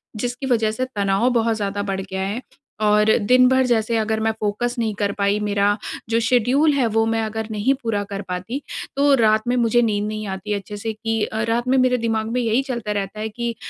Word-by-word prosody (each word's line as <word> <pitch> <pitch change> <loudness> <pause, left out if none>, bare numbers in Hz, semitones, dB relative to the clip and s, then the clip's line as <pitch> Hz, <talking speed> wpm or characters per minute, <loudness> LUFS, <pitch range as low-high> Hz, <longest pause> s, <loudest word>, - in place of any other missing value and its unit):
जिसकी 245 +4 -3
वजह 220 -2 +2
से 255 +4 -2
तनाव 200 +4 +2
बहुत 230 -1 +2
ज़्यादा 205 -1 -2
बढ़ 195 -1 -2
गया 190 0 -5
है। 210 +6 -3 0.4
और 210 +1 +4
दिन 255 0 +6
भर 260 0 +3
जैसे 230 -1 +1
अगर 220 0 0
मैं 220 0 +1
फ़ोकस 215 +4 -1
नहीं 220 -2 0
कर 200 -1 +1
पाई, 200 +1 +1
मेरा 205 0 +1 0.3
जो 230 - +2
शेड़्यूल 250 +6 +3
है 265 -4 +2
वो 225 0 +3
मैं 225 0 0
अगर 220 0 -4
नहीं 215 +5 +1
पूरा 210 -3 -1
कर 200 0 -4
पाती 185 +10 -4 0.3
तो, 280 +1 +4
रात 215 -2 +3
में 245 - +2
मुझे 240 0 +3
नींद 210 -2 0
नहीं 215 0 -4
आती 195 +2 -4
अच्छे 205 +1 -5
से 225 +2 -3
कि 225 0 -2
अ, 220 - -3
रात 235 +2 0
में 265 +1 +3
मेरे 255 -1 +3
दिमाग 225 -1 -1
में 250 - 0
यही 230 +2 +2
चलता 235 -6 -4
रहता 200 0 -3
है 220 +1 -3
कि 235 +1 -4
220 Hz, 225 wpm, -21 LUFS, 210-240 Hz, 0.4 s, दिन